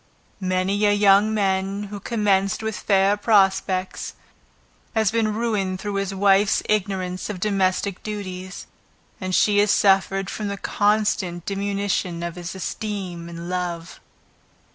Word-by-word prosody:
Many 185 +2 0
a 205 - +5
young 205 +1 +5
man 195 -1 0
who 205 - -5
commenced 205 -1 0
with 220 -1 -2
fair 195 0 +2
prospects, 195 -3 +1 0.8
has 220 -3 +2
been 225 -1 +1
ruined 205 -5 -1
through 205 +1 -4
his 195 -1 -1
wife's 195 +1 +3
ignorance 190 -3 -1
of 205 -3 -4
domestic 195 -1 0
duties, 185 -3 -6 0.6
and 185 -1 -1
she 205 -1 +4
has 205 0 +3
suffered 195 -1 +3
from 210 +1 -4
the 200 0 -3
consequent 205 -4 0
diminution 195 -3 -2
of 170 0 -3
his 175 +2 -7
esteem 190 -3 -5
and 170 0 -7
love. 175 -2 -4
195 Hz, 130 wpm, -23 LUFS, 185-205 Hz, 0.8 s, a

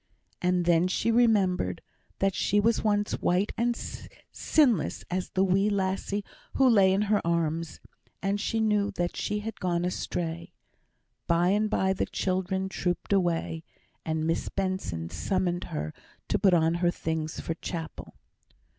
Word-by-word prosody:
And 180 -1 +1
then 170 +1 +4
she 205 +5 0
remembered, 195 - +2 0.4
that 195 0 +1
she 205 - +1
was 225 +2 +2
once 205 -1 +1
white 185 +4 +1
and 235 0 0 0.5
sinless 250 - +2
as 185 0 -2
the 190 - +1
wee 195 +2 +3
lassie 195 +1 -1 0.3
who 270 - +5
lay 200 -6 +5
in 195 +2 +2
her 210 0 +2
arms; 165 -1 -1 0.4
and 200 +1 -1
she 225 +1 -1
knew 210 -2 +2
that 175 0 -1
she 210 0 -2
had 225 0 -6
gone 175 -1 0
astray. 170 -2 -3 0.7
By 170 +1 +3
and 210 +2 +2
by 190 -2 +1
the 190 - -2
children 190 0 -1
trooped 180 0 -2
away, 170 -3 0 0.4
and 160 0 -1
Miss 165 +1 -1
Benson 145 - -3
summoned 185 -2 -1
her 75 +1 -4 0.4
to - - +1
put 190 -3 +5
on 165 0 +3
her 175 - +4
things 160 -2 -3
for 165 - -3
chapel. 165 -1 -7
185 Hz, 150 wpm, -28 LUFS, 170-205 Hz, 0.7 s, who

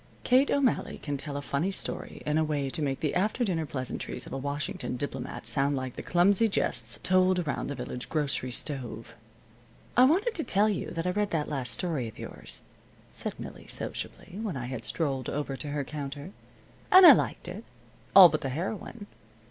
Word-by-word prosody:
Kate 260 +3 +4
O'Malley 275 -4 +1
can 145 -2 -4
tell 140 +1 -5
a 145 - -5
funny 140 +7 0
story 195 - -5
in 150 +1 +2
a - - +3
way 145 -3 -1
to 155 - -3
make 135 -2 -1
the 150 - 0
after 210 +7 +1
dinner 165 -6 -1
pleasantries 130 -2 -4
of - - -9
a - - -2
Washington 140 -2 -3
diplomat 130 -1 -5
sound 140 0 +1
like 130 -2 -4
the - - -5
clumsy 195 +5 +4
jests - - -1
told 185 0 +4
around 165 -5 -2
the 140 - -4
village 125 -2 -6
grocery 145 -4 0
stove. 125 -4 -4 0.8
"I 250 - +7
wanted 390 - +3
to 320 - -2
tell 210 -2 +3
you 205 - -2
that 165 0 -4
I 180 - +2
read 205 +2 0
that 155 -3 -1
last 135 -4 -2
story 155 -9 -1
of 110 - -11
yours," - - -7 0.5
said - - -4
Millie, - - -9
sociably, 190 - -5
when 205 -10 -3
I 125 - -4
had 125 -2 -5
strolled 135 -5 -1
over 145 -1 -3
to 150 - -6
her 145 0 -2
counter, 145 +3 -6 0.6
"and 375 0 +10
I - - +13
liked - - -1
it, - - -6 0.5
all 190 -2 +12
but 155 -2 -2
the 135 - -2
heroine. 195 - -4
150 Hz, 195 wpm, -29 LUFS, 135-190 Hz, 0.8 s, I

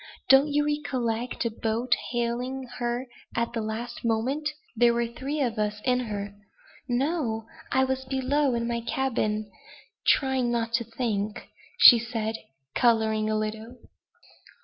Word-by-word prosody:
Don't 270 +2 +7
you 295 0 +1
recollect 250 -6 -2
a 230 - 0
boat 230 +3 0 0.2
hailing 245 +2 -2 0.2
her 240 +1 -1 0.3
at 235 0 -1
the 230 - -1
last 220 +3 -5
moment? 250 +7 0 0.3
There 235 +1 +4
were 235 0 +1
three 270 +5 -4
of 235 -4 -1
us 210 0 -1
in 250 -1 +3
her." 205 -4 -4 0.6
"No! 245 -4 0 0.3
I 265 - +3
was 265 0 -1
below 265 +1 +1
in 235 0 -1
my 235 0 -1
cabin 215 -4 -1 0.6
trying 265 -3 +3
not 230 -1 -1
to 235 0 +2
think," 220 -3 -3 0.3
said 225 -2 +6
she, - - -10 0.3
coloring 220 -3 +2
a 215 - +1
little. 220 +3 -4
235 Hz, 140 wpm, -27 LUFS, 225-260 Hz, 0.6 s, Don't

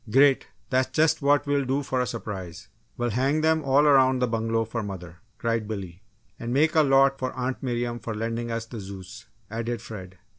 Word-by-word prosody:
"Great! 135 +4 +4 0.2
That's 130 0 +2
just 155 0 +2
what 145 0 +3
we'll 145 -1 +1
do 135 +2 0
for 130 -1 -1
a 125 - -1
surprise. 95 -7 -6 0.3
We'll 120 -1 -1
hang 135 +7 +1
them 160 0 +2
all 140 +2 +4
around 130 -3 +5
the 125 0 +1
bungalow 115 0 0
for 115 +1 -3
mother!" 90 -4 -7 0.2
cried 115 -2 -1
Billy. 95 -4 -6 0.4
"And 120 - -4
make 155 +5 +3
a 160 - +5
lot 135 -1 +4
for 130 -1 -2
Aunt 130 0 -3
Miriam 120 -2 -2
for 115 -2 -5
lending 115 +2 -3
us 115 0 -3
the 115 -1 -8
Zeus," 100 +3 -9 0.2
added 115 +1 -3
Fred. 95 -4 -9
120 Hz, 195 wpm, -26 LUFS, 110-135 Hz, 0.4 s, around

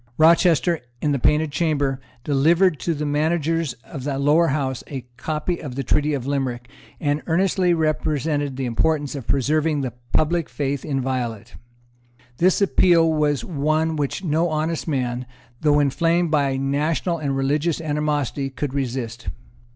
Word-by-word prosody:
Rochester, 170 +1 +4 0.2
in 150 - 0
the 140 - 0
Painted 150 +4 +2
Chamber, 145 -4 0 0.2
delivered 160 +5 +3
to 170 - -1
the 150 +1 -3
managers 160 0 0
of 135 -5 -8
the 140 -1 -2
Lower 150 +5 +3
House 135 -3 -1
a 135 -5 -6
copy 155 +5 -2
of 135 -5 -6
the 135 - -2
Treaty 150 +3 +1
of 130 -3 -4
Limerick, 130 -4 -2 0.3
and 145 0 0
earnestly 180 +1 +2
represented 150 -3 -1
the 135 - -2
importance 145 +4 0
of 135 -5 -7
preserving 150 +2 +1
the 130 -4 -3 0.2
public 160 -3 +1
faith 135 +2 -2
inviolate. 125 -5 -3 0.8
This 185 +3 +3
appeal 170 -4 +4
was 150 -2 +1
one 155 0 0
which 145 +5 -2
no 165 +1 +1
honest 155 +2 -2
man, 125 -4 -2 0.3
though 150 -1 +4
inflamed 165 +4 +1
by 140 -3 +2
national 150 +5 0
and 140 -3 -1
religious 150 +5 0
animosity, 150 -3 -1
could 135 0 -4
resist. 120 -5 -3
150 Hz, 145 wpm, -22 LUFS, 135-160 Hz, 0.8 s, Rochester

